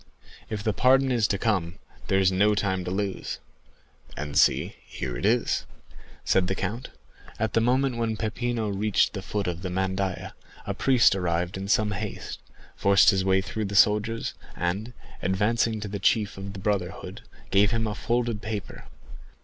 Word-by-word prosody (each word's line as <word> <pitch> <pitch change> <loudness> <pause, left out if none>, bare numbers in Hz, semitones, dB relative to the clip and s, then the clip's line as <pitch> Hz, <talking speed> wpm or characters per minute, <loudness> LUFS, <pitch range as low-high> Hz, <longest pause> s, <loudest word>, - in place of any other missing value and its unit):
"If 105 -2 -4
the 110 - +1
pardon 130 +5 +4
is 115 -3 +2
to 100 - 0
come, 95 -5 0 0.3
there 95 - +2
is 95 -1 +4
no 105 +3 +3
time 95 -2 0
to - - -3
lose." 95 +1 -3 0.8
"And 75 -1 -5
see, - - +3
here 60 -2 -5
it 95 - 0
is," 120 +2 +1 0.6
said 95 -1 +3
the 95 - -1
count. 115 +5 -4 0.5
At 110 -2 -1
the 115 - +3
moment 125 +1 +2
when 115 -2 -1
Peppino 115 0 -2
reached 100 +1 +1
the 100 - -4
foot 100 +1 -3
of 90 -1 -3
the 95 - -4
mandaïa, 95 0 -2 0.3
a - - -2
priest 130 -5 +4
arrived 90 -2 -1
in 95 +1 -5
some 105 +1 +2
haste, 100 - -5 0.4
forced 100 +2 +5
his 95 -2 0
way 95 0 +3
through 110 +2 -4
the 100 0 -4
soldiers, 105 +3 +3 0.2
and, 100 +7 -2 0.3
advancing 110 +4 +1
to 105 - -4
the 100 0 -4
chief 105 +1 +2
of 100 0 -7
the 100 - -7
brotherhood, 95 -3 -3 0.3
gave 100 +1 +5
him 115 +1 0
a 105 - -2
folded 120 -1 -1
paper. 105 -2 -6
100 Hz, 175 wpm, -26 LUFS, 95-110 Hz, 0.8 s, forced